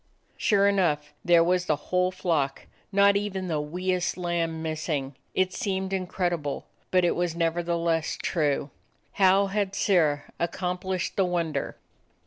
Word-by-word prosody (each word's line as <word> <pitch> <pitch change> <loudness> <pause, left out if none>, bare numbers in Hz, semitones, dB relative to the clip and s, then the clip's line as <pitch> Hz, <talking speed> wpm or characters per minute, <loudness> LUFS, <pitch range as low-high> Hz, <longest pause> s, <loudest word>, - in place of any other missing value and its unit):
Sure 200 -2 +3
enough, 175 -7 +1
there 170 -1 +5
was 180 +1 +1
the 155 - +3
whole 180 +5 0
flock, 165 -7 -1 0.3
not 200 0 +5
even 200 -2 -1
the 155 -3 0
wee 180 +5 -2
est 180 -1 -1
lamb 170 -2 -1
missing. 155 -4 -2 0.2
It 185 0 +1
seemed 190 -1 -2
in 185 -1 -1
credible, 175 -6 -2 0.2
but 185 -1 +3
it 175 - +2
was 175 -1 -1
nevertheless 170 -1 0
true. 145 -4 0 0.5
How 195 +1 +6
had 195 0 -1
Sirrah 155 -7 +2 0.2
accomplished 180 +1 -2
the 195 - +4
wonder? 170 -3 -2
175 Hz, 140 wpm, -26 LUFS, 160-190 Hz, 0.5 s, How